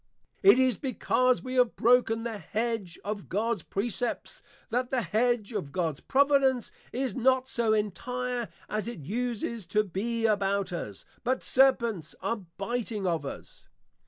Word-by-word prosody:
_ - - -48 0.4
It 390 -8 +8
is 260 -2 +3
because 255 -2 +1
we 255 0 -5
have 245 -2 +4
broken 230 -1 +3
the 225 -3 -4
hedge 220 -2 -2
of 205 -1 -4
Gods 220 +1 0
Precepts, 235 - -3 0.3
that 250 +2 0
the 255 -3 0
hedge 220 +3 +1
of 185 -10 -3
Gods 160 -4 -1
Providence 275 -3 +3 0.2
is 255 -4 -2
not 260 +1 +3
so 235 -4 +1
entire 245 +3 -1 0.2
as 215 +1 -2
it 235 -9 -6
uses 230 - -3
to 210 +3 +2
be 225 +4 -2
about 200 -3 +1
us; 105 - -6 0.2
but 255 +1 0
Serpents 235 - +2
are 230 - -1 0.2
biting 215 0 -2
of 165 -5 0
us. - - -10
230 Hz, 150 wpm, -28 LUFS, 200-250 Hz, 0.4 s, It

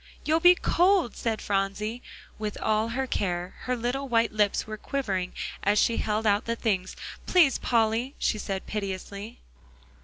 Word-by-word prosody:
"You'll 315 +1 +3
be 355 +2 +7
cold," 355 - +2
said 225 -2 -2
Phronsie. 205 +4 -1 0.4
With 210 -1 -4
all 215 +1 +1
her 260 +3 -2
care, 180 -6 -2
her 250 - 0
little 255 +4 -2
white 230 -1 +3
lips 210 -2 +1
were 215 - -5
quivering 200 -7 -2 0.3
as 205 +1 +2
she 230 - +3
held 215 +1 -1
out 205 0 +3
the 230 - -1
things. 195 -6 -1 0.3
"Please, 330 -8 +4
Polly," 230 +3 +1
she 215 - 0
said 195 -2 -4
piteously. 200 +1 -5
220 Hz, 155 wpm, -27 LUFS, 205-245 Hz, 0.4 s, be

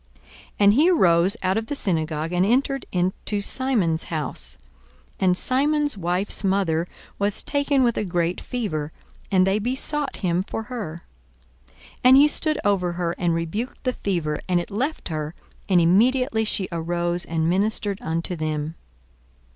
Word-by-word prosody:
42:004:038 - - -27 0.3
And 200 0 +7
he 300 +9 +4
arose 180 - +4
out 185 +2 +1
of 225 0 -3
the 290 - -3
synagogue, 160 - -1
and 180 +1 +2
entered 270 +5 +1
into 185 +3 -1
Simon's 200 -8 0
house. 65 - -4 0.6
And 180 -1 +2
Simon's 290 +4 +2
wife's 185 +3 +1
mother 185 -4 +1 0.3
was 200 +1 -1
taken 285 -2 +1
with 235 -2 +1
a - - 0
great 175 -2 -1
fever; 160 -12 -3 0.4
and 185 -1 +4
they 195 +2 +1
besought 265 +5 -2
him 175 0 +1
for 225 +3 -5
her. 210 -9 -6 0.6
42:004:039 70 - -29 0.3
And 260 +1 +8
he 290 +2 +7
stood 310 +1 0
over 185 -4 +1
her, 170 -1 -1
and 170 -2 +1
rebuked 200 +10 -4
the 255 -1 0
fever; 170 -9 -2
and 180 -1 +3
it 175 - -6
left 265 +7 -2
her: 155 0 -4 0.3
and 185 -2 +5
immediately 220 +6 +3
she 195 -3 0
arose 175 +1 -1
and 160 -1 -1
ministered 200 +2 +1
unto 165 +2 -2
them. 155 -1 -3
190 Hz, 155 wpm, -23 LUFS, 170-240 Hz, 0.6 s, And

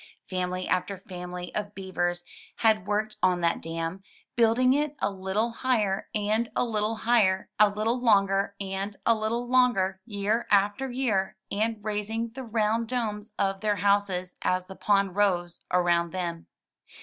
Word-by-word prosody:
Family 185 0 -2
after 185 +2 0
family 180 -1 -6
of 205 -1 -4
beavers 175 -2 -2 0.3
had 215 -4 +2
worked 215 +1 -1
on 180 -1 +3
that 170 0 +1
dam, 165 +3 -4 0.3
building 240 +2 +4
it 295 +1 0
a 200 - 0
little 195 +4 -1
higher 220 -5 0
and 215 +2 +1
a - - +2
Uttle 220 -1 -1
higher, 205 -5 +3
a 210 -1 +7
Uttle 225 +4 -1
longer 200 -3 +3
and 195 +1 -4
a 230 - +6
little 230 +2 -2
longer, 240 -7 +2
year 210 +2 -1
after 205 +6 +2
year; 235 -7 0
and 220 +2 0
raising 215 +2 -2
the 265 - -7
round 225 0 0
domes 215 -3 -3
of 195 -1 0
their 210 -1 +1
houses 200 -2 +1
as 185 0 0
the 190 - -10
pond 195 -2 +1
rose 180 -4 +1
around 175 -1 +2
them. 170 -3 -4
205 Hz, 150 wpm, -27 LUFS, 185-225 Hz, 0.3 s, a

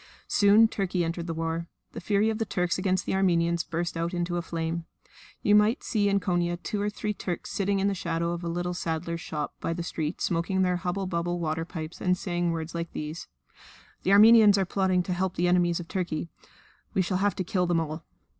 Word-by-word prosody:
Soon 210 +2 +6
Turkey 185 -4 -1
entered 170 +1 -3
the 165 - -2
war. 165 +1 -2 0.2
The - - -7
fury 210 +3 +2
of 220 - -4
the - - +2
Turks 180 -4 -1
against 185 0 0
the - - -1
Armenians 170 -3 +2
burst 170 +1 -3
out 170 +2 -2
into 175 0 -1
a 175 - 0
flame. 165 -1 -3 0.6
You 205 - +4
might 210 +4 +4
see 205 -3 +1
in 200 0 +2
Konia 175 -2 0
two 210 -3 -2
or 205 - 0
three 210 0 -3
Turks 180 -4 -5
sitting 200 0 0
in 195 - +2
the 200 - +1
shadow 170 -2 -2
of 175 0 -4
a - - -3
little 175 +1 -2
saddler's 170 0 -3
shop 150 -1 -4
by 165 - -2
the 170 0 -4
street 160 -1 -3
smoking 185 +2 0
their 180 -1 +1
hubble 180 +3 -2
bubble 175 -1 -2
water 165 0 -2
pipes, 160 -2 -7
and 180 -1 +2
saying 175 -1 -1
words 165 0 -4
like 170 0 -4
these: 155 +2 -5 0.7
"The 190 - +1
Armenians 215 0 +8
are 195 - +2
plotting 185 -1 +1
to 180 - -2
help 185 0 -1
the 175 - +1
enemies 175 -1 +2
of 170 - -7
Turkey. 170 -4 -3 0.7
We 190 - +3
shall 185 +1 -1
have 200 +1 +1
to 185 - -2
kill 180 0 0
them 170 -1 +2
all." 160 0 -4
175 Hz, 220 wpm, -27 LUFS, 170-195 Hz, 0.7 s, Armenians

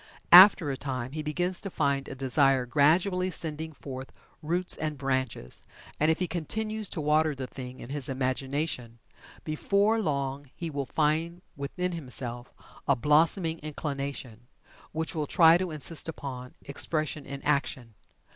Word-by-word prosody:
After 180 -5 +9
a 135 - -4
time 130 -3 -4
he 155 +2 -4
begins 175 +4 -1
to 195 - -4
find 140 -5 0
a - - -7
desire 135 0 +3
gradually 175 +8 +2
sending 160 -2 -4
forth 135 -3 -8 0.3
roots 175 +4 +2
and 155 -2 -3
branches, 130 - -1 0.4
and 155 - +3
if 160 - +2
he 180 - -1
continues 215 +6 -2
to - - -5
water 155 0 +2
the 130 -1 -5
thing 125 0 -9
in 120 - -9
his 140 -2 -2
imagination, 130 -1 -2 0.5
before 200 +8 +1
long 140 -4 -2
he 170 -2 -5
will 140 -2 -3
find 160 +4 0
within 180 +6 -3
himself 125 -6 -5 0.4
a 140 - +4
blossoming 160 - +2
inclination, 140 -5 -5 0.4
which 160 0 -3
will 155 -2 -2
try 165 +1 +6
to 185 -1 -2
insist 155 +1 -1
upon 130 -5 -7
expression 155 +1 0
in 140 0 -6
action. 140 -5 -1
150 Hz, 145 wpm, -28 LUFS, 135-165 Hz, 0.5 s, After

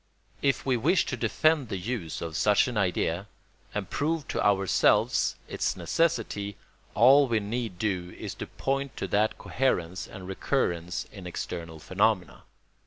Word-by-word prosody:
If 135 -1 +1
we 130 -2 +2
wish 165 +10 +3
to - - -2
defend 135 +3 +2
the 95 - -2
use 95 -4 -4
of 80 -2 -5
such 105 +7 +4
an 125 - -4
idea 95 -1 0 0.4
and 105 -2 -3
prove 155 - -1
to - - -1
ourselves 95 -2 +3
its 80 - -1
necessity, 100 - 0 0.4
all 135 +6 +7
we 115 -3 +2
need 110 -1 -3
do 90 -3 -1
is - - -5
to - - -3
point 135 0 -2
to - - -2
that 105 +4 +2
coherence 95 -9 -1
and 95 -1 -9
recurrence 90 -2 -1
in 95 -4 -9
external 85 -2 -5
phenomena. 95 +3 0
105 Hz, 150 wpm, -28 LUFS, 90-130 Hz, 0.4 s, all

